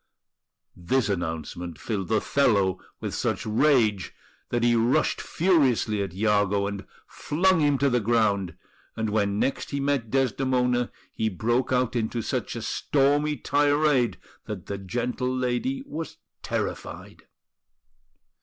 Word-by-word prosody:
This 105 +6 0
announcement 85 -2 -4
filled 100 -3 -3
Othello 105 -5 +2 0.2
with - - -4
such - - -1
rage 110 - +2 0.3
that 120 -1 0
he 120 0 +4
rushed 120 +7 +2
furiously 135 - +2
at 100 -3 -3
Iago, 100 -1 +2
and 100 -1 -5 0.2
flung 180 +4 +1
him 145 -2 +3
to 140 - +2
the 125 -2 +2
ground; 105 -4 +1 0.4
and 110 -2 -2
when 100 -1 +1
next 135 - -1
he 140 - -2
met 140 -5 0
Desdemona 125 -1 +1 0.2
he 110 - 0
broke 120 +7 0
out 125 -1 +1
into 115 0 -1
such - - -3
a - - -5
stormy 145 +1 +1
tirade 145 - +2 0.3
that 100 -4 -6
the 100 -1 -5
gentle 125 +5 -2
lady 130 - -1
was 165 - -6 0.2
terrified. - - -5
120 Hz, 125 wpm, -26 LUFS, 105-140 Hz, 0.4 s, he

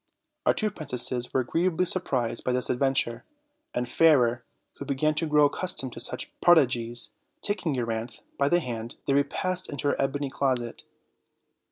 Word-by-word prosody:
Our - - +4
two 215 -1 0
princesses 125 - +3
were 130 - +1
agreeably 175 +7 0
surprised 130 -11 0
by 125 - -1
this 125 0 0
adventure, 130 -2 0 0.5
and 125 0 -3
Fairer, 125 -5 +3 0.3
who 140 - -7
began 145 +2 0
to 160 +2 -1
grow 150 -1 +4
accustomed 145 -5 -1
to - - -9
such 120 - +1
prod 175 -1 +6
igies, 120 -4 +1 0.3
taking 180 -8 -2
Euryanthe 115 -1 -4
by 140 0 +1
the 175 +2 +2
hand, 115 -3 -6
they 140 - +1
repassed 185 +6 -1
into 145 0 -2
her - - -1
ebony 135 0 -2
closet. 125 -4 -2
135 Hz, 160 wpm, -26 LUFS, 120-155 Hz, 0.5 s, prod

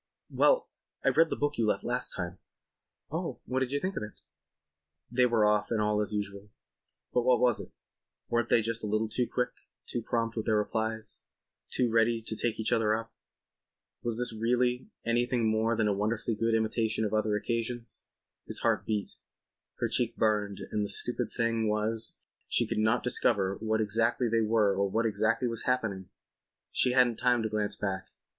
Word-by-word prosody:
"Well, - - +3 0.4
I - - +6
read 165 - +4
the - - -1
book 145 -1 -1
you 115 - +2
left - - 0
last 125 +1 -1
time." 90 -1 -5 0.7
"Oh, - - -3
what 130 +2 -1
do 130 - +1
you 140 +3 -1
think 190 +5 -3
of - - -3
it?" 105 -7 -8 0.9
They 125 0 +4
were 115 -3 +3
off 105 0 +2
and 115 - 0
all 105 0 +1
was 105 -2 0
as 105 - -3
usual. 100 0 -4 0.6
But 125 - +3
was 125 -1 +3
it? - - -8 0.6
Weren't 120 0 0
they 115 - +4
just 115 0 -1
a - - -2
little 110 +2 +1
too 120 +2 0
quick, 125 0 0 0.4
too 120 - -3
prompt 115 0 -1
with 110 - -3
their 110 -1 +3
replies, 110 +1 -2 0.5
too 125 -2 +1
ready 115 0 +3
to 110 0 -3
take 115 0 -1
each 110 - -1
other 110 -1 +3
up? 115 0 -6 0.9
Was 120 -2 -1
this 125 -1 +1
really 125 - 0 0.2
anything 120 0 +1
more 110 +1 +2
than 110 -1 +1
a 105 - +2
wonderfully 110 +3 -1
good 115 +1 +1
imitation 110 0 0
of 105 - -3
other 110 -1 +1
occasions? 115 +2 -3 0.5
His - - -1
heart - - +1
beat; 105 -2 -2 0.6
her - - -1
cheek - - -1
burned 105 -2 +1
and 105 -1 0
the 100 - -2
stupid 120 -1 -1
thing 115 -2 0
was 110 +1 0 0.3
she - - +1
could - - -2
not 110 +3 +2
discover 100 -5 +2
where 110 0 0
exactly 115 +3 +2
they 115 0 +2
were 110 -2 +3
or 100 0 +1
what 115 +4 0
exactly 110 +3 +1
was 115 -1 -3
happening. 105 -7 -1 0.6
She 125 - +2
hadn't 125 -3 +4
time 120 -2 +2
to 110 - -1
glance 105 -1 -1
back. 95 -2 -4
110 Hz, 190 wpm, -30 LUFS, 105-120 Hz, 0.9 s, I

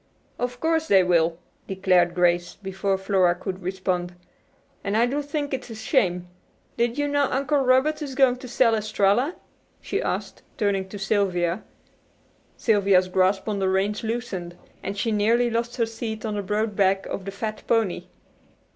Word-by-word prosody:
"Of 245 0 -3
course 320 +1 +1
they 195 -2 +5
will," 170 -2 +2 0.3
declared 185 -2 +2
Grace, 175 -1 +2
before 195 0 -2
Flora 190 -2 +2
could 185 +1 -6
respond. 180 -1 -2 0.7
"And 200 +1 0
I 235 - +4
do 275 +4 -1
think 290 0 -3
it's 255 -2 -4
a 225 - -7
shame. 185 - 0 0.5
Did 235 +1 0
you 290 0 +1
know 285 -1 +1
Uncle 275 +2 +1
Robert 270 +4 +2
is 275 -3 -5
going 255 -2 +4
to 255 - -9
sell 240 -1 +3
Estralla?" 215 - +1 0.4
she - - -2
asked - - -3 0.2
turning 195 -2 0
to 205 - -7
Sylvia. 195 -2 0 1.0
Sylvia's 195 -4 +3
grasp 190 +2 +2
on 210 -2 -1
the 190 -1 +1
reins 195 +2 0
loosened, 210 -7 -4 0.2
and 200 +1 -5
she 225 +2 0
nearly 230 +3 +2
lost 235 +1 -2
her 235 - +1
seat 225 -1 -5
on 215 - -2
the 205 - -2
broad 210 +2 -1
back 195 -1 +2
of 190 - -5
the 195 - -4
fat 215 +2 -5
pony. 225 -5 +1
205 Hz, 165 wpm, -24 LUFS, 190-240 Hz, 1.0 s, they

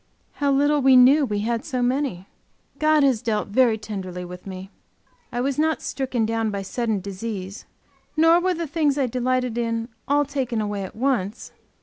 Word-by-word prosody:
How 285 -1 +3
little 290 +1 +3
we 265 0 +6
knew 270 +4 +6
we 205 -4 -2
had 230 +2 -1
so 255 -5 -2
many! 250 -8 -1 0.5
God 310 -1 +4
has 260 -5 +2
dealt 220 -3 -1
very 230 +1 +3
tenderly 190 -4 -6
with 180 +2 -10
me. 190 0 -8 0.6
I 245 - -2
was 275 +2 -1
not 315 0 +2
stricken 255 -4 -2
down 225 0 -1
by 200 -1 -3
sudden 220 0 -2
disease, 195 0 -6 0.5
nor 325 +2 +6
were 365 0 0
the 335 0 -3
things 295 -2 0
I 275 - +2
delighted 250 -1 -1
in 230 0 -2 0.2
all 290 +1 +3
taken 260 -5 -2
away 205 -1 -2
at 190 - -8
once. 235 -4 -1
245 Hz, 180 wpm, -23 LUFS, 210-280 Hz, 0.6 s, we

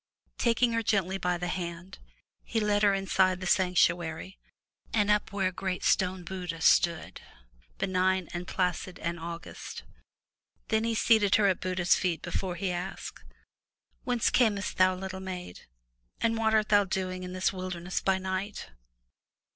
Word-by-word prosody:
Taking 235 0 +2
her 230 - +1
gently 195 -3 0
by 180 -1 0
the 175 +1 -3
hand, 175 +1 -5 0.4
he 225 - -1
led 210 -1 +1
her 200 -1 +4
inside 190 -1 +2
the 185 - -6
sanctuary, 175 -1 +1 0.5
and 210 -2 +2
up 210 0 +1
where 195 -2 0
a - - -10
great 185 0 -3
stone 185 -1 +1
Buddha 180 -2 -5
stood, 170 0 +2 0.6
benign 185 -1 +1
and 175 0 -5
placid 180 0 -2
and 170 0 -3
august. 170 +1 -7 0.9
Then 220 0 +2
he 230 0 0
seated 215 -3 +4
her 210 - +4
at 190 -2 +2
Buddha's 185 -1 +2
feet 175 -4 0
before 180 0 -3
he 185 +1 -2
asked: 180 +1 -6 0.8
"Whence 245 -2 +1
camest 210 -5 +1
thou, 185 0 +4
little 190 0 -6
maid, 180 - -7 0.5
and 230 0 +1
what 220 -1 +2
art 215 -1 +2
thou 205 -1 +5
doing 185 -1 -3
in 180 0 -6
this 185 +1 0
wilderness 185 -1 -4
by 190 -1 +2
night?'' 190 - -4
185 Hz, 155 wpm, -29 LUFS, 180-200 Hz, 0.9 s, thou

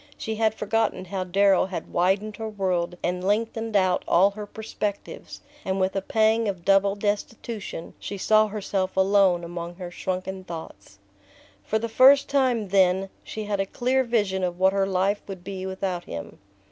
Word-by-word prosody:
She 220 -1 -4
had 220 -1 +2
forgotten 215 -3 -1
how 190 +1 -3
Darrow 195 +1 +3
had 190 - -6
widened 195 +4 +1
her 220 -1 -4
world 180 -4 -1
and 180 +1 -1
lengthened 225 +2 -1
out 185 -2 +3
all 190 +4 +5
her 210 0 -7
perspectives, 210 -1 -6 0.2
and 190 0 -1
with 190 +1 0
a 195 - 0
pang 220 +2 +2
of 185 -4 -4
double 195 0 +4
destitution 205 -2 -4
she 200 - -6
saw 215 +2 +4
herself 195 -2 -3
alone 190 -2 +4
among 170 0 -6
her 180 -1 -7
shrunken 185 +1 -4
thoughts. 160 - -9 0.7
For 220 - 0
the 230 +1 -2
first 270 +5 +6
time, 255 -7 +1
then, 190 0 +3
she 215 - -6
had 205 -1 -2
a 195 - +1
clear 255 +5 +1
vision 205 -6 0
of 175 -1 -1
what 190 +1 +3
her 195 -1 +1
life 195 +2 +1
would 190 -3 -8
be 190 0 -5
without 190 -2 -3
him. 85 - -8
195 Hz, 170 wpm, -25 LUFS, 185-215 Hz, 0.7 s, first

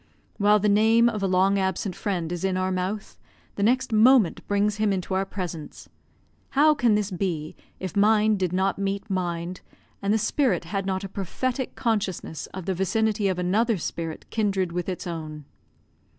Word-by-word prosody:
While 210 0 +5
the 210 0 +1
name 220 +3 +5
of 220 -3 -1
a 195 - +1
long 190 +2 +3
absent 190 0 -1
friend 175 -5 -2
is 175 0 -4
in 190 -1 0
our 185 0 0
mouth, 185 +3 -3 0.3
the - - -5
next 250 +3 +2
moment 220 -3 +5
brings 205 +1 +1
him 215 -1 +1
into 190 0 -2
our 190 +1 0
presence. 175 -6 -6 0.7
How 305 +2 +6
can 240 -7 +3
this 210 -1 -1
be, 170 -4 -3 0.2
if 185 -3 -5
mind 210 0 +4
did 185 -2 0
not 190 +2 0
meet 200 +1 -2
mind, 175 -1 -3 0.4
and 200 - 0
the 220 - +4
spirit 265 +4 +1
had 195 -2 -3
not 190 0 -1
a - - -4
prophetic 240 +7 -3
consciousness 200 -8 -2
of 190 -2 -8
the 190 - 0
vicinity 210 +3 0
of 185 -2 0
another 205 +5 +1
spirit, 165 -1 -5
kindred 195 -5 0
with 175 +1 -3
its 185 - -4
own? 155 -4 -6
195 Hz, 180 wpm, -25 LUFS, 185-215 Hz, 0.7 s, How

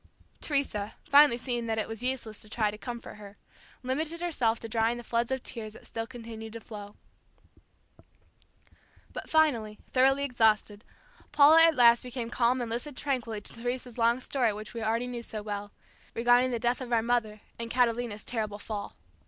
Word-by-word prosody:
Teresa, 270 -8 -1
finally 285 -4 +7
seeing 240 -2 -3
that 220 -1 -1
it 220 - -1
was 225 0 -6
useless 245 -4 -3
to 215 - -11
try 215 -2 0
to 210 - -9
comfort 240 -2 -7
her, 205 -1 -12 0.5
limited 310 +6 -1
herself 260 -10 0
to 230 - -7
drying 225 +1 +1
the 240 - -8
floods 235 0 0
of 265 -1 -2
tears 215 -3 -4
that - - -14
still 225 0 -5
continued 225 -3 -9
to 230 - -6
flow. 205 -3 -10 2.2
But - - -7
finally, 240 -10 +2
thoroughly 270 +2 +4
exhausted, 220 -5 +1 0.5
Paula 305 +3 +7
at 325 -1 +4
last 235 -2 +6
became 245 -2 -6
calm 245 +1 +2
and 235 - -3
listened 250 +4 -4
tranquilly 240 -6 -2
to - - -2
Teresa's 245 +1 -5
long 235 +2 +3
story 250 -4 +1
which 215 +2 -8
we 230 - -5
already 225 +2 0
knew 245 -1 -5
so 220 -2 -7
well, 205 -1 -5 0.4
regarding 245 +2 +4
the 245 - -1
death 240 +2 0
of 250 -1 -6
our 230 -2 +3
mother 220 -3 0 0.2
and 230 0 -4
Catalina's 235 -3 0
terrible 215 -4 -3
fall. 205 0 -6
235 Hz, 175 wpm, -29 LUFS, 220-250 Hz, 2.2 s, finally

